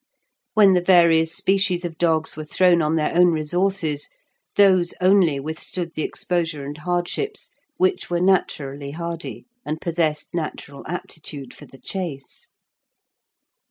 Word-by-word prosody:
When 205 Hz, -3 st, +6 dB
the 180 Hz, -, +3 dB
various 170 Hz, -3 st, +5 dB
species 185 Hz, 0 st, +1 dB
of 165 Hz, -2 st, -6 dB
dogs 160 Hz, -2 st, +1 dB
were 155 Hz, -, -6 dB
thrown 175 Hz, +3 st, +3 dB
on 155 Hz, +1 st, +1 dB
their 155 Hz, -1 st, 0 dB
own 180 Hz, +1 st, +6 dB
resources, 160 Hz, -1 st, -1 dB, 0.5 s
those 185 Hz, -4 st, +4 dB
only 185 Hz, -6 st, +4 dB
withstood 160 Hz, +4 st, -5 dB
the -, -, -3 dB
exposure 165 Hz, -4 st, -2 dB
and 145 Hz, +1 st, -6 dB
hardships 175 Hz, -, -3 dB, 0.3 s
which 375 Hz, 0 st, +1 dB
were 175 Hz, -1 st, 0 dB
naturally 145 Hz, -7 st, 0 dB
hardy, 170 Hz, +2 st, -6 dB, 0.2 s
and 155 Hz, +1 st, -4 dB
possessed 165 Hz, -3 st, -1 dB
natural 150 Hz, -4 st, -5 dB
aptitude 155 Hz, -5 st, -7 dB
for -, -, -13 dB
the 135 Hz, -, -16 dB
chase. 165 Hz, -5 st, -6 dB
170 Hz, 130 wpm, -22 LUFS, 155-180 Hz, 0.5 s, When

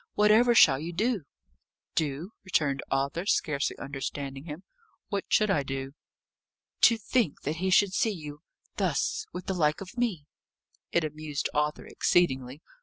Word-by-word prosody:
Whatever 220 Hz, +3 st, +5 dB
shall 135 Hz, -10 st, +7 dB
you 165 Hz, +3 st, -5 dB
do?" 210 Hz, -, 0 dB, 0.7 s
"Do!" 155 Hz, +6 st, -2 dB
returned 145 Hz, -7 st, 0 dB
Arthur, 140 Hz, +7 st, -1 dB
scarcely 140 Hz, -8 st, 0 dB
understanding 140 Hz, 0 st, -5 dB
him. 160 Hz, +3 st, -8 dB, 0.5 s
"What 200 Hz, -3 st, -2 dB
should 215 Hz, -2 st, +3 dB
I 155 Hz, -, +2 dB
do?" 135 Hz, 0 st, -4 dB, 1.0 s
"To 230 Hz, -, 0 dB
think 225 Hz, -, 0 dB
that 155 Hz, +3 st, -2 dB
he 190 Hz, +3 st, -1 dB
should 190 Hz, +1 st, +4 dB
see 225 Hz, -, +2 dB
you 150 Hz, -7 st, -7 dB, 0.4 s
thus 435 Hz, 0 st, 0 dB
with 180 Hz, -, -7 dB
the 190 Hz, -, -1 dB
like 150 Hz, -4 st, +1 dB
of 190 Hz, +2 st, -9 dB
me!" 200 Hz, -12 st, -1 dB, 0.7 s
It 170 Hz, -, +2 dB
amused 155 Hz, -1 st, -3 dB
Arthur 150 Hz, 0 st, -1 dB
exceedingly. 135 Hz, -4 st, +1 dB
160 Hz, 145 wpm, -28 LUFS, 145-195 Hz, 1.0 s, shall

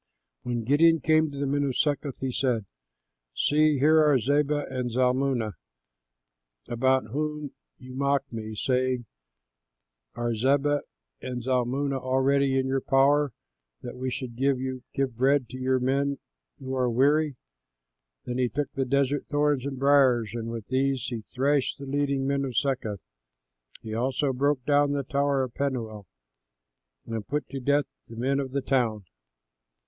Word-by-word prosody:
When 120 Hz, -2 st, -3 dB
Gideon 160 Hz, +6 st, +4 dB
came 155 Hz, +1 st, +3 dB
to 140 Hz, -, -9 dB
the 140 Hz, -, -1 dB
men 145 Hz, +1 st, 0 dB
of 135 Hz, -3 st, -1 dB
Succoth, 145 Hz, -2 st, -1 dB
he 130 Hz, -1 st, -1 dB
said, 120 Hz, -4 st, 0 dB, 0.7 s
"See, 150 Hz, -, +3 dB
here 155 Hz, +3 st, +5 dB
are 150 Hz, -3 st, +4 dB
Zebah 145 Hz, +3 st, +1 dB
and 125 Hz, -2 st, -3 dB
Zalmunna 125 Hz, -2 st, +1 dB, 1.1 s
about 130 Hz, -1 st, +1 dB
whom 150 Hz, +1 st, -3 dB, 0.3 s
you 130 Hz, 0 st, -11 dB
mocked 140 Hz, 0 st, 0 dB
me, 110 Hz, -1 st, -5 dB
saying, 125 Hz, +1 st, 0 dB, 1.1 s
'Are 120 Hz, 0 st, -1 dB
Zebah 140 Hz, +5 st, +2 dB, 0.4 s
and 125 Hz, -2 st, -5 dB
Zalmunna 130 Hz, +2 st, 0 dB
already 135 Hz, +1 st, +2 dB
in 130 Hz, -, +1 dB
your 135 Hz, 0 st, 0 dB
power 140 Hz, +2 st, +3 dB, 0.5 s
that 120 Hz, -, -7 dB
we 130 Hz, +1 st, -3 dB
should 125 Hz, -2 st, -5 dB
give 130 Hz, -1 st, -2 dB
bread 135 Hz, 0 st, +3 dB
to 130 Hz, -, -8 dB
your 130 Hz, 0 st, +1 dB
men 140 Hz, +2 st, 0 dB, 0.4 s
who 130 Hz, 0 st, -6 dB
are 125 Hz, -1 st, +1 dB
weary?'" 145 Hz, +4 st, +2 dB, 0.9 s
Then 125 Hz, 0 st, -3 dB
he 125 Hz, -1 st, +2 dB
took 145 Hz, +2 st, -3 dB
desert 140 Hz, +1 st, 0 dB
thorns 145 Hz, -2 st, +1 dB
and 135 Hz, -1 st, -5 dB
briers, 130 Hz, -5 st, +3 dB
and 115 Hz, -1 st, -4 dB
with 115 Hz, -2 st, -5 dB
these 135 Hz, 0 st, 0 dB
he 120 Hz, -3 st, -4 dB
thrashed 140 Hz, +1 st, +1 dB
the 140 Hz, -, -8 dB
leading 140 Hz, -1 st, 0 dB
men 140 Hz, 0 st, 0 dB
of 130 Hz, -4 st, -4 dB
Succoth. 120 Hz, -, -1 dB, 0.8 s
He 110 Hz, -, -6 dB
also 130 Hz, +4 st, 0 dB
broke 135 Hz, 0 st, 0 dB
down 145 Hz, -1 st, +3 dB
the 140 Hz, -1 st, -1 dB
tower 140 Hz, -1 st, +1 dB
of 125 Hz, -2 st, -5 dB
Penuel 115 Hz, -8 st, -3 dB, 1.0 s
and 110 Hz, -2 st, -5 dB
put 145 Hz, -1 st, -2 dB
to 135 Hz, -, -5 dB
death 145 Hz, +2 st, +2 dB, 0.2 s
the 115 Hz, -, -11 dB
men 135 Hz, +4 st, 0 dB
of 135 Hz, -1 st, -3 dB
the 140 Hz, +2 st, -2 dB
town. 115 Hz, -7 st, 0 dB
135 Hz, 150 wpm, -27 LUFS, 125-140 Hz, 1.1 s, here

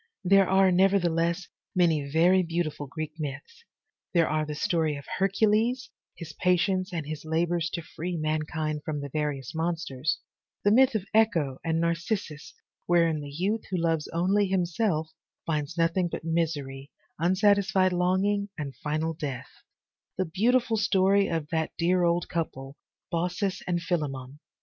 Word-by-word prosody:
There 195 Hz, 0 st, +5 dB
are, 190 Hz, 0 st, +5 dB
nevertheless, 175 Hz, -2 st, +2 dB, 0.3 s
many 160 Hz, -6 st, +2 dB
very 175 Hz, +5 st, +4 dB
beautiful 165 Hz, -4 st, -2 dB
Greek 155 Hz, +2 st, -6 dB
myths. 145 Hz, -, -6 dB, 0.5 s
There 165 Hz, -2 st, +4 dB
are 155 Hz, 0 st, 0 dB
the 150 Hz, -, -4 dB
story 160 Hz, -1 st, 0 dB
of 140 Hz, 0 st, -9 dB
Hercules, 220 Hz, +5 st, +2 dB, 0.2 s
his 170 Hz, -, -9 dB
patience 185 Hz, +1 st, +1 dB
and 165 Hz, -4 st, -3 dB
his 150 Hz, 0 st, -6 dB
labors 165 Hz, +1 st, 0 dB
to 170 Hz, -, -3 dB
free 175 Hz, +3 st, -5 dB
man 155 Hz, 0 st, 0 dB
kind 155 Hz, -1 st, -2 dB
from 150 Hz, -2 st, -3 dB
the 140 Hz, 0 st, -5 dB
various 145 Hz, -3 st, -3 dB
monsters, 160 Hz, -4 st, -1 dB, 0.5 s
the 205 Hz, -, +4 dB
myth 255 Hz, +1 st, +5 dB
of 200 Hz, -3 st, -1 dB
Echo 165 Hz, -12 st, +2 dB
and 165 Hz, -1 st, 0 dB
Narcissus, 170 Hz, -1 st, -2 dB, 0.3 s
wherein 165 Hz, -3 st, +3 dB
the 145 Hz, -, -7 dB
youth 190 Hz, +9 st, -2 dB
who 185 Hz, -, -1 dB
loves 165 Hz, -2 st, 0 dB
only 190 Hz, +4 st, +1 dB
himself 175 Hz, -3 st, 0 dB, 0.3 s
finds 155 Hz, 0 st, -2 dB
nothing 170 Hz, +2 st, +2 dB
but 170 Hz, -, -6 dB
misery, 150 Hz, -5 st, -2 dB, 0.3 s
unsatisfied 190 Hz, +1 st, +3 dB
longing 190 Hz, +3 st, +1 dB
and 140 Hz, -3 st, -5 dB
final 155 Hz, +2 st, -2 dB
death, 145 Hz, -5 st, -5 dB, 0.7 s
the 185 Hz, -, +1 dB
beautiful 225 Hz, +6 st, +2 dB
story 200 Hz, -1 st, +3 dB
of 160 Hz, -3 st, -2 dB
that 160 Hz, -1 st, -1 dB
dear 175 Hz, +1 st, +2 dB
old 170 Hz, 0 st, +1 dB
couple, 140 Hz, -5 st, -4 dB, 0.4 s
Baucis 180 Hz, +3 st, -1 dB
and 175 Hz, -1 st, -1 dB
Philemon. 140 Hz, -5 st, -3 dB
170 Hz, 145 wpm, -27 LUFS, 155-190 Hz, 0.7 s, There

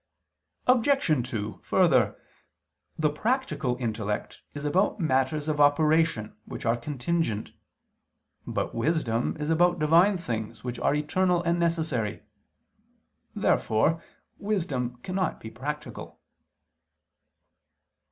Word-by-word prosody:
Obj. 235 Hz, -, +3 dB
2: 105 Hz, -5 st, -4 dB
Further, 135 Hz, -, +3 dB, 0.8 s
the 155 Hz, -2 st, +2 dB
practical 155 Hz, -, -1 dB
intellect 105 Hz, -3 st, -3 dB
is 145 Hz, 0 st, -5 dB
about 180 Hz, +9 st, +1 dB
matters 145 Hz, -1 st, +1 dB
of 150 Hz, -1 st, +1 dB
operation 150 Hz, -6 st, +3 dB
which -, -, -7 dB
are 115 Hz, 0 st, +3 dB
contingent. 130 Hz, -2 st, -2 dB, 1.0 s
But -, -, -2 dB
wisdom 120 Hz, -1 st, 0 dB
is 150 Hz, +1 st, -1 dB
about 175 Hz, +2 st, +3 dB
Divine 170 Hz, +6 st, +4 dB
things 115 Hz, -8 st, -5 dB
which 125 Hz, -1 st, -4 dB
are 145 Hz, -, +2 dB
eternal 175 Hz, +4 st, +1 dB
and 170 Hz, 0 st, +1 dB
necessary. 155 Hz, -12 st, -1 dB, 1.1 s
Therefore 155 Hz, +10 st, +2 dB, 0.4 s
wisdom 145 Hz, -, -2 dB
cannot 185 Hz, -2 st, -2 dB
be 110 Hz, -, -9 dB
practical. 140 Hz, 0 st, -6 dB
150 Hz, 100 wpm, -27 LUFS, 120-170 Hz, 1.1 s, Divine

